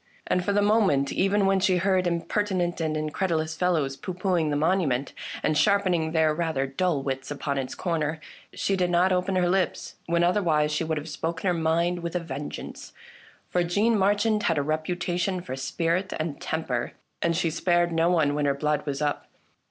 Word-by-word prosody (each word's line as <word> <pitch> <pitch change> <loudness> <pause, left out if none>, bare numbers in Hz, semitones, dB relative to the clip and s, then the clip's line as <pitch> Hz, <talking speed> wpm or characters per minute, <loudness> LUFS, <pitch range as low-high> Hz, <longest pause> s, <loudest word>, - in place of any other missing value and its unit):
And 180 - 0
for 200 - 0
the 205 0 +2
moment, 200 -10 +3
even 195 +1 +2
when 195 0 +3
she 185 -1 +3
heard 185 0 +2
impertinent 175 +1 -1
and 155 -1 -1
in 155 0 -2
credulous 160 -3 -1
fellows 160 -6 0
pooh 180 +5 -6
poohing 180 -4 +1
the 145 - 0
monument, 150 -4 +1 0.3
and 155 - +1
sharpening 185 -2 +2
their 160 -1 +3
rather 160 -4 -1
dull 140 +1 -1
wits 135 -1 -3
upon 140 -1 -2
its 130 -1 -4
corners, 160 -3 -1 0.3
she 195 - -1
did 180 -2 +1
not 175 +2 +3
open 185 +1 0
her 180 -1 +2
lips, 185 0 -1
when 170 0 +2
otherwise 170 -5 +2
she 150 +2 0
would 160 -1 -1
have 150 +1 -5
spoken 165 +3 -3
her 180 - +3
mind 170 +2 +1
with 170 +1 -5
a - - +2
vengeance; 155 -3 -7 0.5
for 180 - +1
Jeanne 205 +7 +2
Mar 200 0 +3
chand 210 +1 +1
had 165 -5 +1
a 145 - +1
reputation 175 +4 -1
for 175 -7 -6
spirit 165 +8 -1
and 155 -2 -4
temper, 135 -7 -2 0.3
and 170 -1 +1
she 165 - +1
spared 175 +1 +1
no 165 +1 +2
one 155 -5 +2
when 145 0 0
her 140 -1 +2
blood 150 +1 0
was 140 +1 -2
up. 145 -1 -2
170 Hz, 195 wpm, -26 LUFS, 155-185 Hz, 0.5 s, moment